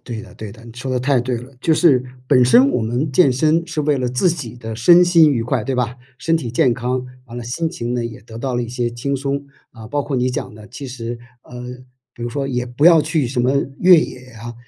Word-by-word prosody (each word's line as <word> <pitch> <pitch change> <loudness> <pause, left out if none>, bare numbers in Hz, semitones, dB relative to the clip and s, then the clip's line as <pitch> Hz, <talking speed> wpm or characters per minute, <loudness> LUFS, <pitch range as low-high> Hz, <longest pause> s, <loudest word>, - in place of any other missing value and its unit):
对 115 -3 -6
的， 115 - -14
对 105 -2 -8
的， 115 - -15
你 115 - -11
说 125 +3 -6
得 130 - 0
太 130 0 +2
对 125 0 -2
了， 125 +3 -12
就 165 - +2
是 140 -7 +4 0.2
本 130 -2 +5
身 250 - +6
我 - - 0
们 120 +7 -1
健 135 0 +4
身 155 +5 +1
是 160 -2 -3
为 150 -1 +1
了 125 -1 -1
自 125 +9 +1
己 125 -8 -6
的 115 -2 -7
身 170 +10 +6
心 170 -3 +5
愉 120 -4 0
快， 125 -1 -1
对 135 - -2
吧？ 125 0 -1 0.2
身 165 0 +1
体 125 -8 -4
健 125 +1 +2
康， 125 +1 -2 0.2
完 120 -1 -10
了 120 - -5
心 160 +8 -2
情 120 -7 -4
呢 120 -1 -2
也 115 -2 -7
得 110 +1 -12
到 130 +1 -3
了 120 - 0
一 115 - -6
些 120 -1 -2
轻 135 +4 -3
松， 140 +1 -3 0.3
啊， 110 -2 -11
包 145 +5 -2
括 140 -1 -3
你 125 0 +1
讲 125 - -5
的 105 0 -13
其 130 +3 -8
实， 120 -2 -6 0.2
呃 125 0 -10 0.5
比 120 - -10
如 120 - -2
说 135 +3 -3
也 125 -2 -2
不 125 +4 -2
要 165 -2 +7
去 155 -2 0
什 125 +1 -2
么 125 +2 +2 0.3
越 180 -1 +7
野 140 - -3 0.2
啊、 120 +1 -8
125 Hz, 280 characters per minute, -19 LUFS, 120-145 Hz, 0.5 s, 要